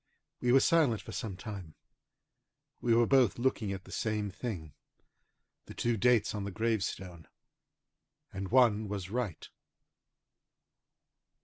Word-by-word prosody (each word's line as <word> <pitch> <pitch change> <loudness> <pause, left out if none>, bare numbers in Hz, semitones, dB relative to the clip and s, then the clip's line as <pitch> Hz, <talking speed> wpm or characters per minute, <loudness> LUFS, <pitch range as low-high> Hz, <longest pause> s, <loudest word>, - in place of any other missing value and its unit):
We 125 - +1
were 135 - +7
silent 140 -7 +3
for - - -9
some 100 -5 -5
time. 95 -7 -8 1.1
We 115 -1 +3
were 120 0 +5
both 130 -4 +4
looking 120 -4 0
at 95 -1 -5
the - - -14
same 105 -2 -2
thing, 95 - -6 0.9
the - - -11
two 120 0 0
dates 115 0 +3
on 105 -2 -3
the 100 - -3
gravestone, 95 -5 -2 1.1
and 95 -1 -4
one 115 -4 +4
was 100 -2 -5
right. 115 -8 -3
110 Hz, 125 wpm, -31 LUFS, 95-120 Hz, 1.1 s, were